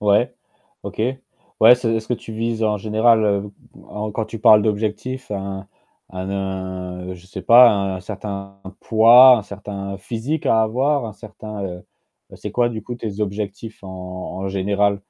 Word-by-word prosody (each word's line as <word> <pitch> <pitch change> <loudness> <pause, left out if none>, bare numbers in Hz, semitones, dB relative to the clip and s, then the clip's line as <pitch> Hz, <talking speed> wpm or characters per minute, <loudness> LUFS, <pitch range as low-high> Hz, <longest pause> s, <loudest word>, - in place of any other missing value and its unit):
Ouais, 105 +3 +2 0.5
OK. - - -6 0.6
Ouais, 115 +3 +9
c'est 120 -2 -2
est-ce 110 0 -5
que 125 - 0
tu 115 - -10
vises 115 0 -2
en 105 -1 +1
général, 105 -1 +2 0.3
en 105 - -7
en - - -4
quand 110 +1 -2
tu 115 - -8
parles 105 0 +6
d'objectifs, 110 +5 -3
un 95 -1 -5 0.4
un 95 +1 -5
a 100 - -2
un, 95 -1 -5
je 90 0 -16
sais 95 -1 -8
pas, 120 +4 +8
un 95 -2 -2
certain 100 0 -7 0.2
poids, 120 +3 +7
un - - -5
certain 100 -1 -7
physique 120 +10 -4
à 110 0 +4
avoir, 130 +5 0
un 110 - -6
certain, 105 -1 -9
heu 90 -1 -7 0.5
c'est - - -7
quoi, 120 -1 +2
du 110 -2 -5
coup, 120 - -6
tes 110 -3 -6
objectifs 105 +2 -5
en 95 - -9
en 90 +1 -6
général? 100 +1 0
105 Hz, 170 wpm, -20 LUFS, 95-115 Hz, 0.6 s, Ouais